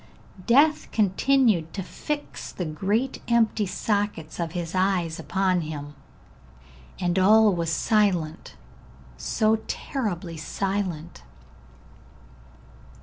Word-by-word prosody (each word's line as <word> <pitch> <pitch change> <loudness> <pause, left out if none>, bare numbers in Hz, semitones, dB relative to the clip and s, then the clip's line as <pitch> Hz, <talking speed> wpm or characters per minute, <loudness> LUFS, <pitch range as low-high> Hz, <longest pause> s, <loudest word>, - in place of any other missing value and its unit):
Death 295 +6 +4
continued 215 -4 +2
to 195 - -3
fix 290 +10 -5
the 180 - -4
great 200 - -1
empty 225 -3 +2
sockets 200 -6 -2
of 165 -1 -3
his 170 -1 -4
eyes 185 -3 0
upon 190 -2 +1
him, 145 -2 -6 1.1
and 175 +1 +1
all 215 +2 +6
was 170 -2 -1
silent, 185 -6 0 0.6
so 215 - +1
terribly 180 - -3
silent. 180 - -3
190 Hz, 90 wpm, -25 LUFS, 165-215 Hz, 1.1 s, all